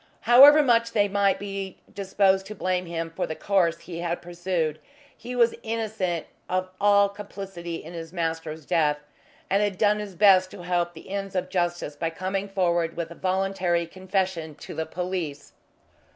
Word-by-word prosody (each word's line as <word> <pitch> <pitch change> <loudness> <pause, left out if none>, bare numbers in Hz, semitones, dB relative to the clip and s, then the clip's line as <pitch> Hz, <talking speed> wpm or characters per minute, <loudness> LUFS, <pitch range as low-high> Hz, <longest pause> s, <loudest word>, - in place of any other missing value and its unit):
However 280 +6 +8
much 230 -3 +3
they 205 -2 +3
might 200 0 +2
be 195 -1 -5 0.2
disposed 195 -1 +2
to 215 - -7
blame 185 -2 -1
him 165 -1 -4
for - - -1
the 160 - -4
course 175 -4 +1
he 170 -2 -7
had 170 0 -2
pursued, 175 -3 -2 0.4
he 250 +1 -7
was 235 -1 +4
innocent 220 -7 -2 0.2
of 185 0 -1
all 200 0 +5
complicity 195 -4 -7
in 165 +1 -8
his 165 -1 -7
master's 160 -3 -3
death, 155 -4 +2 0.5
and 200 +1 +2
had 205 -3 0
done 210 +1 +3
his 205 -3 -7
best 185 -1 +6
to 185 -2 -10
help 175 -1 -1
the 160 - -11
ends 195 -1 -4
of 185 0 -1
justice 175 -4 -1
by 165 +3 -2
coming 190 +4 -3
forward 170 -3 0
with 170 -1 -4
a - - -6
voluntary 185 -2 0
confession 185 -3 -2
to - - -9
the 160 - -3
police. 175 -4 -4
185 Hz, 170 wpm, -25 LUFS, 170-200 Hz, 0.5 s, However